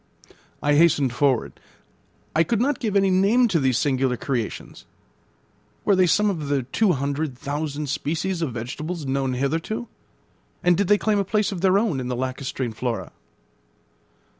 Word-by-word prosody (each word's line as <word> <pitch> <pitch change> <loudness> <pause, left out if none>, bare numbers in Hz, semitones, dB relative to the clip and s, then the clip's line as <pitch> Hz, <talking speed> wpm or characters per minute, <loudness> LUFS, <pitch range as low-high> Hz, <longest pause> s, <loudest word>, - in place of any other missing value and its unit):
I 145 - +3
hastened 145 -5 +4
forward. 135 -2 0 0.8
I 160 - +5
could 205 +7 0
not 270 +3 +1
give 215 -4 -2
any 195 -1 +4
name 205 +7 +4
to 175 -5 +2
these 130 -3 +2
singular 130 -3 +1
creations. 120 -5 -4 1.0
Were 200 - +4
they 185 -1 +4
some 210 +5 +3
of 165 -8 -2
the 140 -2 0
two 185 - +1
hundred 140 0 -2
thousand 145 +2 -3
species 165 +6 -2
of 155 -6 -1
vegetables 150 +8 -5
known 135 -1 -1
hitherto, 165 - -2 0.8
and 175 0 +4
did 200 +1 0
they 205 - +5
claim 210 -1 +1
a - - +2
place 210 +2 0
of 185 -4 -5
their 190 0 +4
own 205 -10 0
in 125 - -4
the 125 - -2
lacustrine 130 -1 -3
flora? 120 0 -3
155 Hz, 165 wpm, -23 LUFS, 135-195 Hz, 1.0 s, I